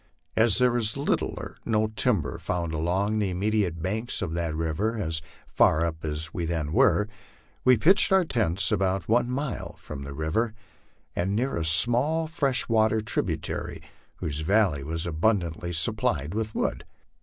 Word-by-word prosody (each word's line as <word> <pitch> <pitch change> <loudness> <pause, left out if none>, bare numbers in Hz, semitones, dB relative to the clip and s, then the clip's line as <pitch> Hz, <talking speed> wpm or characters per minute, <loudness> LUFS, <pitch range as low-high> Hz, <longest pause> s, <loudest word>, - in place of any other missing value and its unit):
As 110 -3 +4
there 125 -1 +3
is 110 +1 -1
little 140 - 0
or - - -8
no 110 -1 +1
timber 110 0 0
found 85 -2 -2
along 95 +7 0
the 100 -2 0
immediate 95 -3 -1
banks 110 +4 -2
of 85 -4 -3
that 85 -2 -2
river 80 +8 -1
as 80 -6 -1 0.3
far 80 +2 +3
up 80 -1 -4
as 75 0 -2
we 85 - -3
then 80 -2 -2
were, 105 +4 +4 0.6
we 125 -1 +6
pitched 190 - +5
our 190 -2 +5
tents 100 - 0
about 95 -2 0
one 120 +2 +2
mile 135 +2 -3
from 75 -2 -8
the 70 0 -7
river, 95 +10 -1 0.6
and 95 +3 0
near 130 +5 0
a 85 - -1
small 120 - +3
fresh 145 -5 0
water 110 -1 +3
tributary 110 - -2 0.4
whose 75 -1 -4
valley 90 -4 +2
was 80 +3 -2
abundantly 85 0 0
supplied 80 -1 0
with 110 0 -3
wood. - - -1
100 Hz, 160 wpm, -26 LUFS, 80-115 Hz, 0.6 s, we